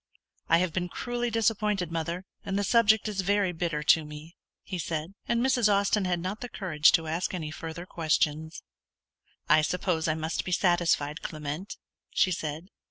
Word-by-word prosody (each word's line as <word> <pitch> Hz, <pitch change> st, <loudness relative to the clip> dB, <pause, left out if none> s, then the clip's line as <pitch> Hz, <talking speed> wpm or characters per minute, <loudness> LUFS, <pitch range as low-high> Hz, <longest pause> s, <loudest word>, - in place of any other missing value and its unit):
"I 165 Hz, -, +6 dB
have 175 Hz, -2 st, 0 dB
been 180 Hz, -1 st, -2 dB
cruelly 240 Hz, +4 st, -3 dB
disappointed, 210 Hz, -5 st, 0 dB
mother, 170 Hz, +3 st, -3 dB, 0.2 s
and 195 Hz, 0 st, -2 dB
the 205 Hz, -, +1 dB
subject 220 Hz, 0 st, +4 dB
is 205 Hz, -2 st, -1 dB
very 200 Hz, 0 st, +1 dB
bitter 165 Hz, -3 st, -2 dB
to 160 Hz, +1 st, +5 dB
me," 150 Hz, +2 st, -10 dB, 0.3 s
he 185 Hz, -2 st, -5 dB
said; 160 Hz, +2 st, -3 dB
and 235 Hz, +1 st, +1 dB
Mrs. 245 Hz, -5 st, +3 dB
Austin 200 Hz, 0 st, +2 dB
had 175 Hz, -1 st, 0 dB
not 185 Hz, +5 st, -4 dB
the 245 Hz, -, -5 dB
courage 160 Hz, -8 st, +3 dB
to 165 Hz, -2 st, +3 dB
ask 165 Hz, +4 st, -2 dB
any 155 Hz, -4 st, -4 dB
further 165 Hz, +2 st, -7 dB
questions. 160 Hz, -2 st, -1 dB, 0.8 s
"I 155 Hz, +1 st, +6 dB
suppose 170 Hz, 0 st, 0 dB
I 155 Hz, -, +1 dB
must 160 Hz, +1 st, -2 dB
be 180 Hz, -, -5 dB
satisfied, 175 Hz, -4 st, +1 dB
Clement," 155 Hz, +5 st, -5 dB, 0.3 s
she 185 Hz, -, +2 dB
said. 160 Hz, +1 st, -4 dB
175 Hz, 170 wpm, -28 LUFS, 160-200 Hz, 0.8 s, I